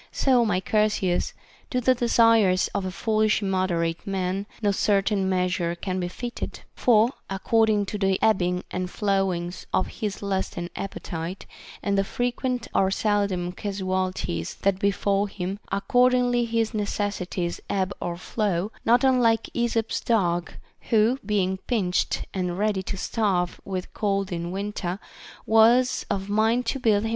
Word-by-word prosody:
So, 255 -3 +3
my 205 -5 +1
Chersias, 205 -3 +1 0.4
to 250 - 0
the 255 +1 +4
desires 230 -6 +4
of 195 - -3
a 185 - -3
foolish 215 +3 +1
immoderate 185 -2 -1
man 195 +1 -2
no 205 -2 +2
certain 195 -1 +1
meas 185 0 +1
ure 170 0 -1
can 185 +1 -3
be 175 - -1
fitted; 240 +7 -6
for, 230 0 +4 0.2
according 210 +2 +2
to 205 +1 -5
the 195 -1 +2
ebbings 180 -4 +2
and 180 0 -3
flow 195 -1 +1
ings 175 +1 -5
of 185 - +2
his 205 -2 -3
lust 190 -1 -2
and 175 0 -4
appetite, 175 -2 -5 0.4
and 200 -1 +1
the - - +3
frequent 245 +2 -2
or 190 - +3
seldom 195 -3 0
casualties 185 - -2
that 195 -1 +2
befall 200 0 +1
him, 195 0 -4
accordingly 245 +3 +3
his 225 -1 0
necessities 200 -4 -2
ebb 190 0 0
or 170 -1 -3
flow, 200 0 -1
not 240 +3 +4
unlike 240 -4 +3
Esop's 230 -2 0
dog, 175 -7 +1 0.4
who, 225 +4 +3
being 195 -2 0
pinched 195 -7 0
and 180 -2 -2
ready 205 -1 +1
to 195 +1 -5
starve 185 -4 -1
with 185 -2 -5
cold 195 -2 -1
in 170 0 -3
winter, 195 -1 -3 0.5
was 235 +3 +4
of 195 0 -2
mind 220 +4 +2
to 270 - -1
build 215 -4 +3
* - - -2
II. - - -1
200 Hz, 150 wpm, -25 LUFS, 185-220 Hz, 0.5 s, the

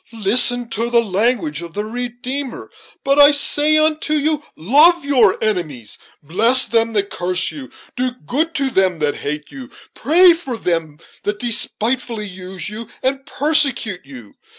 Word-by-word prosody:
Listen 240 +3 +2
to 230 +1 -2
the 240 -1 +3
language 195 - -1
of 170 -1 -9
the 210 +3 -4
Redeemer: 245 +3 -6 0.3
'But 275 +1 +1
I 285 0 +9
say 295 +1 +3
unto 310 0 +1
you, 300 0 0
love 295 - +3
your 245 -9 +3
enemies; 155 - -3 0.2
bless 230 - +3
them 230 0 0
that 200 -2 -1
curse 180 +1 -1
you; 270 -3 -10 0.3
do 255 +1 0 0.2
good 315 +5 -1
to 275 -2 -1
them 190 -4 +1
that 150 -2 -2
hate 150 +1 -6
you; 265 -2 -10 0.2
pray 345 +4 +5
for 320 -8 -5
them 165 -6 -3 0.2
that 205 0 -3
despitefully 230 -1 -1
use 185 0 -6
you 215 +2 -7 0.2
and 270 +1 -2
persecute 275 - 0
you.' 125 -6 -13
235 Hz, 150 wpm, -18 LUFS, 185-275 Hz, 0.3 s, I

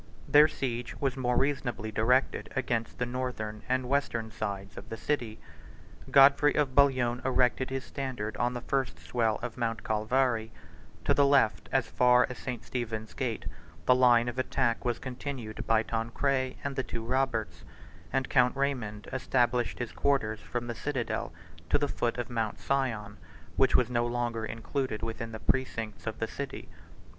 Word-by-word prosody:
Their 150 +1 +7
siege 125 -5 -3
was 135 -2 0
more 125 -2 0
reasonably 125 -6 -1
directed 125 +5 +1
against 120 -3 -1
the 125 - 0
northern 120 -4 -4
and 130 0 +1
western 120 -5 0
sides 100 -2 -4
of - - -10
the 110 - -5
city. 120 -7 -2 0.7
Godfrey 140 +1 +6
of 145 -3 +1
Bouillon 130 -3 +3
erected 130 0 +2
his 135 0 -3
standard 130 -8 -4
on 120 +1 0
the 120 - -3
first 135 -2 -1
swell 115 -3 0
of 125 -1 -5
Mount 115 -2 -2
Calvary: 110 +1 +1 0.5
to - - +4
the 140 -1 +4
left, 140 -6 +3
as - - +2
far 125 0 +4
as 125 - -8
St. 125 -4 -5
Stephen's 110 -3 -4
gate, 120 -5 -3 0.4
the 125 - +6
line 120 -2 +5
of 120 +1 -3
attack 130 -2 0
was 120 -2 0
continued 125 -3 -6
by 110 -1 +4
Tancred 130 +4 -1
and 140 -1 -3
the 130 - +1
two 115 -3 -5
Roberts; 125 -3 -1 0.5
and 135 -1 0
Count 125 -1 +3
Raymond 120 -7 -2
established 125 -2 +1
his 120 -2 -4
quarters 110 -6 +1
from 120 +2 -4
the 120 - -3
citadel 130 -1 -2 0.4
to - - +4
the 145 0 0
foot 120 -3 -1
of 120 - -2
Mount 115 -3 -2
Sion, 110 -7 -1 0.4
which 130 -1 +3
was 125 -1 +3
no 120 0 +1
longer 120 -2 -2
included 115 0 -3
within 115 0 -4
the 110 - -6
precincts 110 -9 -2
of - - -3
the - - -2
city. - - -6
125 Hz, 165 wpm, -29 LUFS, 115-130 Hz, 0.7 s, Their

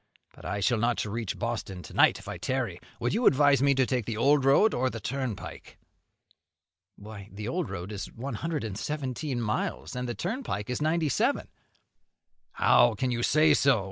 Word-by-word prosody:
But - - -15
I 100 +3 -2
shall 120 +3 +2
not 120 0 +1
reach 110 0 -4
Boston 95 -2 -4
to - - -11
night - - +5
if - - -13
I - - -6
tarry. - - -2 0.2
Would - - -1
you 230 +4 +3
advise 140 -1 +5
me 140 0 +4
to 130 0 +3
take 125 -4 -1
the 115 -2 -3
old 140 +4 +4
road, 175 +11 +5
or 130 +1 +1
the 115 - -6
turnpike?" 125 0 -5 1.2
"Why, 105 -1 -10
the 105 +2 -6
old 175 +5 -2
road 90 +4 -6
is 100 -1 -6
one 130 +4 -6
hundred 155 +4 -3
and 105 -4 -4
seventeen 140 -2 -3
miles, 115 +4 -2
and 125 0 -3
the 120 - -3
turnpike 175 - -3
is 125 - -3
ninety 160 +1 +1
seven." - - 0 1.0
"How - - +4
can 130 -1 -1
you 120 -1 -1
say 155 +4 +4
so? 135 -5 +4
125 Hz, 190 wpm, -28 LUFS, 110-145 Hz, 1.2 s, night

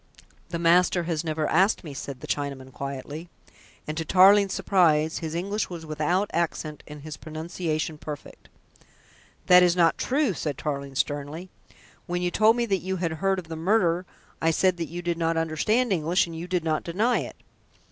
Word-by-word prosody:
"The 170 - -3
master 175 +1 +3
has 165 -1 -2
never 155 -1 -1
asked 190 +6 +3
me," 150 -4 -7
said 135 -1 -7
the - - -7
Chinaman 135 -2 -4
quietly, 140 +4 -6 0.6
and 155 - -4
to - - -1
Tarling's 195 +3 +6
surprise 160 -6 +2
his 160 -1 -5
English 200 +5 -2
was 170 -3 -7
without 160 +6 0
accent 155 -3 -2
and 150 -1 -10
his 155 -1 -7
pronunciation 155 0 -4
perfect. 150 -1 -9 1.0
"That 180 0 +8
is 175 -1 +4
not 170 -2 +3
true," 270 -4 +1
said 150 -4 -3
Tarling 140 -2 -4
sternly. 145 +6 -3 0.6
"When 175 0 -2
you 175 - 0
told 220 +4 +4
me 240 -1 0
that 200 -4 +1
you 190 +1 -3
had 170 -3 -2
heard 190 +4 0
of 180 -3 -6
the 160 - -6
murder, 180 0 +1 0.3
I 165 - +3
said 180 +2 +2
that 165 -3 -4
you 175 +2 -6
did 170 -1 -1
not 165 0 +1
understand 195 +9 +1
English, 170 +1 +2
and 165 -1 -9
you 165 +2 -6
did 180 -2 -1
not 155 -1 0
deny 215 +9 +1
it." - - -6
165 Hz, 185 wpm, -26 LUFS, 155-185 Hz, 1.0 s, That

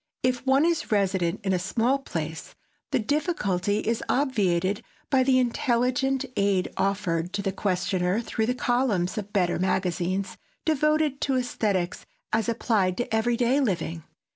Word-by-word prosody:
If 250 -1 +1
one 270 +3 +4
is 335 -7 0
resident 190 -2 +1
in 190 -1 +1
a 180 - +1
small 235 +9 +1
place, 160 - -5 0.3
the - - +1
difficulty 210 - 0
is 230 0 0
obviated 205 -7 +1 0.3
by 265 -2 +4
the 260 0 +4
intelligent 255 +2 +1
aid 200 -2 +1
offered 185 -3 -1
to 200 - -2
the 195 - 0
questioner 185 0 0
through 220 -1 -2
the 250 - 0
columns 240 -8 0
of 205 - -5
the 205 - -28
better 180 -4 +1
magazines 185 +1 -1 0.3
devoted 305 -2 +2
to 270 - +1
esthetics 210 -7 -1 0.3
as 225 +1 +1
applied 210 -5 +1
to 240 - -3
every 235 +2 +1
day 245 +4 +2
living. 175 - -1
215 Hz, 150 wpm, -26 LUFS, 185-255 Hz, 0.3 s, one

